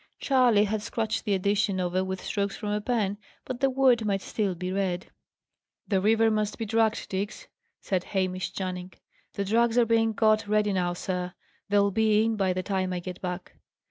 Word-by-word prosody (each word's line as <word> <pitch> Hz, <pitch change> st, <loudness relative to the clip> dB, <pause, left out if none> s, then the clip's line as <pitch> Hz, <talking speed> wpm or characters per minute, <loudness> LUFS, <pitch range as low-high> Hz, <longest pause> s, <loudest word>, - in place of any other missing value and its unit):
Charley 250 Hz, -6 st, +4 dB
had 215 Hz, 0 st, -1 dB
scratched 220 Hz, 0 st, -2 dB
the 205 Hz, -, +2 dB
addition 200 Hz, 0 st, +1 dB
over 180 Hz, +1 st, 0 dB
with 190 Hz, 0 st, -4 dB
strokes 200 Hz, -1 st, -2 dB
from 210 Hz, -, -4 dB
a 210 Hz, 0 st, 0 dB
pen, 210 Hz, -3 st, -1 dB, 0.3 s
but 255 Hz, -2 st, -5 dB
the 270 Hz, -, +3 dB
word 255 Hz, -3 st, +3 dB
might 195 Hz, -2 st, -1 dB
still 200 Hz, -4 st, -1 dB
be 180 Hz, +2 st, -4 dB
read. 185 Hz, -2 st, -2 dB, 0.8 s
"The 195 Hz, -3 st, +1 dB
river 225 Hz, +2 st, +4 dB
must 215 Hz, -1 st, -1 dB
be 225 Hz, -, -3 dB
dragged, 225 Hz, +1 st, +1 dB
Diggs," 200 Hz, -, -4 dB, 0.3 s
said 185 Hz, -3 st, -1 dB
Hamish 185 Hz, -1 st, -2 dB
Channing. 185 Hz, -1 st, -5 dB, 0.4 s
"The 200 Hz, -, -2 dB
drags 230 Hz, +3 st, +2 dB
are 240 Hz, -, +5 dB
being 225 Hz, 0 st, +2 dB
got 215 Hz, -1 st, +3 dB
ready 210 Hz, -1 st, +2 dB
now, 175 Hz, -2 st, 0 dB
sir. 180 Hz, 0 st, -4 dB, 0.3 s
They'll 200 Hz, 0 st, +3 dB
be 215 Hz, +1 st, +3 dB
in, 225 Hz, 0 st, +1 dB
by 195 Hz, -3 st, +1 dB
the 185 Hz, 0 st, -2 dB
time 190 Hz, -2 st, -1 dB
I 180 Hz, -, -2 dB
get 180 Hz, 0 st, -7 dB
back." 180 Hz, 0 st, -5 dB
205 Hz, 190 wpm, -27 LUFS, 185-220 Hz, 0.8 s, are